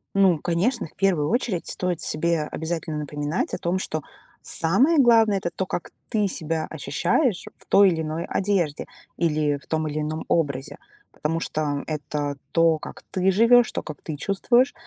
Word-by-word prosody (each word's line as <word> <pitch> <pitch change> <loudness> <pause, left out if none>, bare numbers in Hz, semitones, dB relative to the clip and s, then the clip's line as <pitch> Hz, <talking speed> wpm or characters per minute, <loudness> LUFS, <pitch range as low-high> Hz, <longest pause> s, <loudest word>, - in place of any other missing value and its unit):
Ну, 190 -4 +5
конечно, 180 - 0
в - - -13
первую 175 -7 +1
очередь 230 -7 -1
стоит 180 -2 -2
себе 165 0 0
обязательно 160 0 -4
напоминать 150 +2 -2
о - - -5
том, 175 +2 -1
что 155 -5 -3 0.4
самое 255 - +2
главное- 225 -5 +5
это 175 - -2
то, 190 - -1
как 175 - -5 0.2
ты 210 -2 +1
себя 160 -2 -2
ощущаешь 250 - 0
в - - -16
той 200 -1 +6
или 160 -2 -1
иной 155 +2 -3
одежде 185 -7 0 0.3
или 150 -3 +1
в - - -18
том 155 -1 -1
или 150 +1 -2
ином 155 +1 -3
образе. 140 -5 -1 0.3
Потому 165 +2 -2
что 145 -3 -2
это 150 -2 -3 0.2
то, 165 -1 +4
как - - -10
ты 190 +1 +2
живешь, 230 +4 +5
то, - - -3
как 155 -3 -9
ты 155 - -4
чувствуешь. 240 - +2
165 Hz, 170 wpm, -24 LUFS, 155-195 Hz, 0.4 s, той